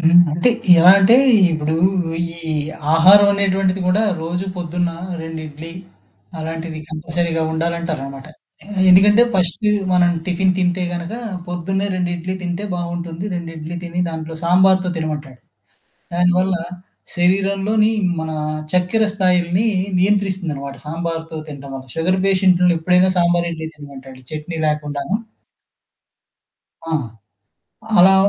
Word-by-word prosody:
హ్మ్. 170 +2 +6
అంటే 170 +10 +2 0.3
ఎలా 175 +2 +8
అంటే, 200 +5 +6 0.4
ఇప్పుడు 155 0 -1 0.5
ఈ - - -6 0.7
ఆహారం 195 +5 +7
అనేటువంటిది 195 -1 0
కూడా 205 +4 +2 0.2
రోజు 175 +3 -3
పొద్దున్న 175 0 -2 0.3
2 160 0 -6
ఇడ్లీ, 155 +3 -10 0.7
అలాంటిది 160 0 -5
కంపల్సరీగా 165 +1 -2
ఉండాలంటారన్నమాట. 160 -5 -3 0.6
ఎందుకంటే, 205 +5 +6
ఫస్టు 185 +4 0 0.2
మనం 175 -1 +4 0.2
టిఫిన్ 185 +1 +1
తింటే 180 0 0
గనుక, 175 +5 -5 0.3
పొద్దున్నే 190 +3 -2
2 180 -1 -1
ఇడ్లీ 180 +2 -4
తింటే 180 +3 -4
బావుంటుంది. 175 0 -5
2 170 -1 -5
ఇడ్లీ 160 +3 -6
తిని, 175 +1 -3
దాంట్లో 160 0 -6
సాంబార్‌తో 185 +1 +3
తినమంటాడు. 150 -5 -5 0.8
దానివల్ల 180 +1 +2 0.6
శరీరంలోని 195 +4 +2 0.3
మన 160 0 -4 0.4
చక్కెర 180 +5 +2
స్థాయిల్ని 180 +1 +1 0.3
నియంత్రిస్తుందన్నమాట. 180 -8 -1
సాంబార్‌తో 165 0 -4
తింటం 140 -1 -9
వల్ల. 130 -1 -8
షుగర్ 180 +3 0
పేషెంట్లు 180 -2 +3
ఎప్పుడైనా 180 +3 +3
సాంబారు 175 0 +2
ఇడ్లీ 160 -1 -6
తినమంటాడు. 135 -3 -12
చట్నీ 155 +2 -6
లేకుండాను. 150 +3 -2 1.7
ఆ! 165 0 -7 1.0
అలా 190 +2 +7
175 Hz, 110 wpm, -19 LUFS, 160-185 Hz, 1.7 s, ఎలా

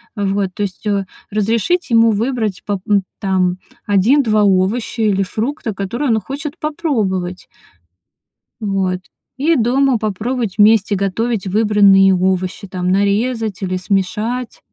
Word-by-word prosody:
Вот, 200 -2 -1
то 205 - -2
есть, 200 +1 -5
э, 200 -1 0 0.2
разрешить 225 - 0
ему 230 -1 +5
выбрать 220 -2 -1
поп 200 -2 -2
м, 205 -2 +3 0.2
там, 185 -3 0 0.3
1-2 215 +2 +3
овоща 205 +5 +1
или 200 -2 +2
фрукта, 220 +4 -3
которые 235 +9 -2
он 225 -1 +3
хочет 285 - -6
попробовать. 215 - -2 1.1
Вот, 190 -3 -1 0.4
и 315 +5 +2
дома 260 +1 +2
попробовать 220 +1 -3
вместе 210 -1 +4
готовить 200 +2 -1
выбранные 200 -1 +5
им 185 -1 +2
овощи, 185 +1 -1
там, 180 -1 -3
нарезать 205 +2 0
или 185 -1 -2
смешать. 210 +6 -2
210 Hz, 125 wpm, -17 LUFS, 195-235 Hz, 1.1 s, ему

